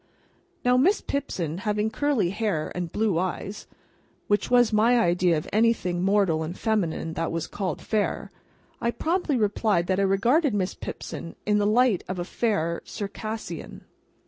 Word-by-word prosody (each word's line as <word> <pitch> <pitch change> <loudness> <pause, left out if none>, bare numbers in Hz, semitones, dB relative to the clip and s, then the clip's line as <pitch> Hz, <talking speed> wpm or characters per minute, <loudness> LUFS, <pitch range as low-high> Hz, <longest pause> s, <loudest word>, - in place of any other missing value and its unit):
Now, 250 0 +5
Miss 370 +11 +4
Pipson, 180 - -3
having 210 +1 0
curly 255 -8 +1
hair 200 -7 -1
and 175 -2 -4
blue 210 -5 +1
eyes 190 +3 -4 0.6
(which 205 0 +1
was 245 -2 +4
my 230 +3 +4
idea 175 -3 +3
of 150 - -4
anything 215 -5 +2
mortal 195 -4 +2
and 160 +3 -4
feminine 180 -7 -1
that 165 0 -2
was 165 0 -2
called 185 -7 -4
Fair), 215 -2 -1 0.5
I 235 - +1
promptly 320 +2 0
replied 210 -4 +1
that 185 +1 0
I - - +3
regarded 230 - +3
Miss 185 -2 0
Pipson 165 - -7
in 210 0 +3
the 205 - +2
light 230 -3 +3
of 185 - -3
a 175 - -3
Fair 185 -6 -1
Circassian. 215 +2 -6
205 Hz, 155 wpm, -26 LUFS, 175-230 Hz, 0.6 s, Now